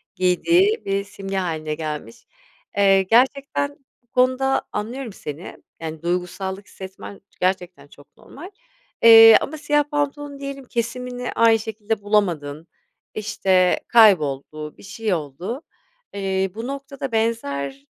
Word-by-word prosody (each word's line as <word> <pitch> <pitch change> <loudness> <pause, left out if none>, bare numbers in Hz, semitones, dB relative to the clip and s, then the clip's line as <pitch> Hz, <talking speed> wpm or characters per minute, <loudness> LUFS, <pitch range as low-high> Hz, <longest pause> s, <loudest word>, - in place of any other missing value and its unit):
giydiği 340 - +2
bir 195 0 -1
simge 195 -1 -6
hâline 155 -4 -2
gelmiş. 155 +8 -6 0.5
Eee, 195 -1 +5
gerçekten 275 +6 +1 0.3
bu - - -40
konuda 255 +1 +2
anlıyorum 230 +2 -5
seni, 150 -1 -8 0.2
yani, 160 -1 -6
duygusallık 185 +3 -3
hissetmen 190 +1 -10 0.2
gerçekten 180 -5 -2
çok 145 0 -20
normal, 340 +8 -12 0.5
eee, 225 -1 +10
ama 315 - -5
siyah 295 0 +2
pantolon 290 -1 -3
diyelim 275 -1 -7
kesimini 245 +1 -4
aynı 225 -1 +4
şekilde 220 -1 -4
bulamadın, 170 -7 0 0.5
işte, 190 -3 +2
kayboldu, 155 - +3
bir - - -16
şey 210 +1 -3
oldu, 170 - -5 0.5
eee, 190 -1 -1
bu 225 +2 -5
noktada 275 -1 -6
benzer 140 -12 -2
205 Hz, 115 wpm, -22 LUFS, 180-250 Hz, 0.5 s, eee